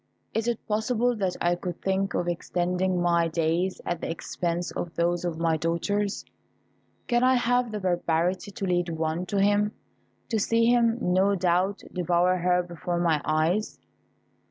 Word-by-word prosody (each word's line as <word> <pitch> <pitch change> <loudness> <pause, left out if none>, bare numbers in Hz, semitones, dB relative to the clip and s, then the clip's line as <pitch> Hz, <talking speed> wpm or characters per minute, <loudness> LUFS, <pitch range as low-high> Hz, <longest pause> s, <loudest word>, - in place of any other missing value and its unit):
Is 225 +1 -1
it 235 -2 -2
possible 235 +3 +1
that 190 -3 -1
I 175 0 +2
could 175 0 -5
think 195 0 -1
of 175 - -1
extending 180 +1 -1
my 170 -1 +2
days 165 +3 0
at 175 -1 -2
the - - -3
expense 170 +1 -3
of 175 -1 -5
those 175 +1 0
of 170 -2 -2
my 165 -1 +1
daughters? 195 +6 -1 0.8
Can 240 0 +2
I 255 0 +5
have 245 -1 +1
the 210 - -3
barbarity 175 0 0
to 200 0 -5
lead 175 -1 0
one 160 +2 -2
to 200 - 0
him, 205 +1 +2 0.6
to 225 - +1
see 230 +3 +2
him, 235 -1 +3
no 190 0 +2
doubt, 185 +2 +1
devour 180 0 +2
her 180 0 +2
before 175 0 -4
my 165 -4 +2
eyes?" 160 +7 0
180 Hz, 160 wpm, -26 LUFS, 170-205 Hz, 0.8 s, I